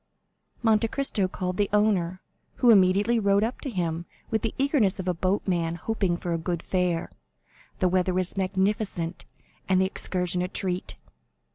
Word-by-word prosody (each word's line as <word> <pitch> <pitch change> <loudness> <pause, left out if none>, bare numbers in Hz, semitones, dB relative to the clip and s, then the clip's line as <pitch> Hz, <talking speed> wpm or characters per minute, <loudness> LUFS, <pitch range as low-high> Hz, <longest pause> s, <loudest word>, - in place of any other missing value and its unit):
Monte 225 0 +3
Cristo 220 -6 0
called 185 -1 -4
the 205 -1 +1
owner, 195 -4 +1 0.3
who 245 -2 +5
immediately 200 +3 +4
rowed 200 -1 +3
up 230 +4 -3
to 275 - -4
him 170 -5 -2 0.2
with 220 - +1
the 225 - -2
eagerness 265 -9 +2
of 185 - -4
a 180 - +2
boatman 175 -2 0
hoping 190 -1 -1
for 175 -1 -3
a 165 - -1
good 170 0 -3
fare. 180 -3 -1 0.7
The 185 - +2
weather 185 0 +1
was 185 0 0
magnificent, 190 -2 -1 0.4
and 185 -1 +4
the 190 - +3
excursion 180 -1 -1
a 180 - 0
treat. 185 -1 -3
185 Hz, 160 wpm, -26 LUFS, 180-210 Hz, 0.7 s, who